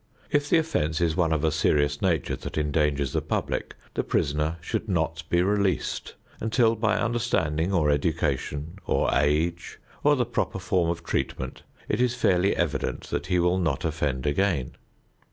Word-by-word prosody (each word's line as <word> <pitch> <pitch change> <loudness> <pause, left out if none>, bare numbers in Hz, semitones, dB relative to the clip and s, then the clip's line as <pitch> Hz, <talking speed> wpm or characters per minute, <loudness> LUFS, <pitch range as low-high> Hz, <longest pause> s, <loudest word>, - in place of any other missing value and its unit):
If 145 0 +1
the - - +5
offense 110 - 0
is 85 -2 +1
one 85 -2 +2
of 80 -1 +1
a 80 - +3
serious 75 -1 +1
nature 85 -8 +1
that - - -7
endangers 75 -2 +1
the - - +1
public, - - -2 0.2
the - - -1
prisoner 75 +3 0
should 95 +6 -3
not 80 -3 0
be 85 0 +3
released 100 -1 0 0.2
until 115 +1 +2
by 110 -1 +1
understanding 100 -9 0
or 80 -6 +3
education, 75 +2 -1
or - - +2
age, 80 +4 0 0.3
or 145 0 +5
the 125 -3 +1
proper 120 -4 -2
form 95 -3 +1
of 85 0 -3
treatment, - - -3 0.3
it 105 - 0
is 125 -1 +2
fairly 95 -4 +2
evident - - -2
that - - -2
he 90 - +2
will 90 +1 +2
not 80 -6 -1
offend 75 -5 -1
again. 75 -3 +1
85 Hz, 165 wpm, -26 LUFS, 75-100 Hz, 0.3 s, the